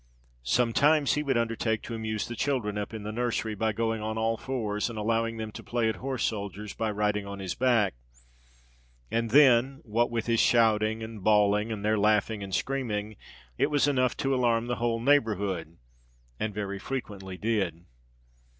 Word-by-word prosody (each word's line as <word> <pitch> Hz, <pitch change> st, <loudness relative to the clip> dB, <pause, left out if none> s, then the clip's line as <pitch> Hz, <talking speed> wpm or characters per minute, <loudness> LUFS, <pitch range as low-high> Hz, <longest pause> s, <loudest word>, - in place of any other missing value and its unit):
Sometimes 125 Hz, -, +3 dB
he 150 Hz, -, 0 dB
would 135 Hz, -4 st, 0 dB
undertake 115 Hz, -1 st, -1 dB
to 120 Hz, -, -6 dB
amuse 110 Hz, -1 st, -3 dB
the 120 Hz, -, -6 dB
children 120 Hz, -5 st, -1 dB
up 105 Hz, -1 st, -3 dB
in 110 Hz, -2 st, -6 dB
the 105 Hz, -, -4 dB
nursery, 115 Hz, -1 st, -1 dB
by 110 Hz, +2 st, 0 dB
going 115 Hz, 0 st, -1 dB
on 110 Hz, +1 st, -3 dB
all 115 Hz, 0 st, +1 dB
fours 110 Hz, -4 st, -2 dB
and 115 Hz, -, -7 dB
allowing 115 Hz, +1 st, 0 dB
them 110 Hz, -1 st, -5 dB
to -, -, -9 dB
play 120 Hz, -2 st, 0 dB
at 110 Hz, -, -3 dB
horse 130 Hz, -2 st, -3 dB
soldiers 100 Hz, -1 st, -3 dB
by 110 Hz, -, -2 dB
riding 105 Hz, -1 st, -1 dB
on 100 Hz, 0 st, -6 dB
his 95 Hz, -2 st, -4 dB
back; 115 Hz, -7 st, +2 dB, 1.2 s
and 115 Hz, 0 st, 0 dB
then, 135 Hz, 0 st, +5 dB
what 115 Hz, 0 st, +1 dB
with 115 Hz, -1 st, -2 dB
his 115 Hz, -1 st, +1 dB
shouting 110 Hz, -1 st, +3 dB
and 110 Hz, -3 st, -8 dB
bawling, 105 Hz, +1 st, +3 dB
and 105 Hz, -2 st, -4 dB
their 110 Hz, 0 st, +2 dB
laughing 105 Hz, +1 st, +2 dB
and 95 Hz, -1 st, -3 dB
screaming, 110 Hz, -6 st, -2 dB, 0.4 s
it 140 Hz, +3 st, +3 dB
was 145 Hz, -1 st, +2 dB
enough 130 Hz, -3 st, +1 dB
to 135 Hz, 0 st, 0 dB
alarm 120 Hz, -3 st, +2 dB
the 120 Hz, 0 st, -2 dB
whole 115 Hz, -1 st, 0 dB
neighbourhood—and 85 Hz, -, -2 dB
very 100 Hz, -1 st, -4 dB
frequently 100 Hz, -7 st, -5 dB
did. 95 Hz, -6 st, -1 dB
110 Hz, 175 wpm, -28 LUFS, 105-120 Hz, 1.2 s, then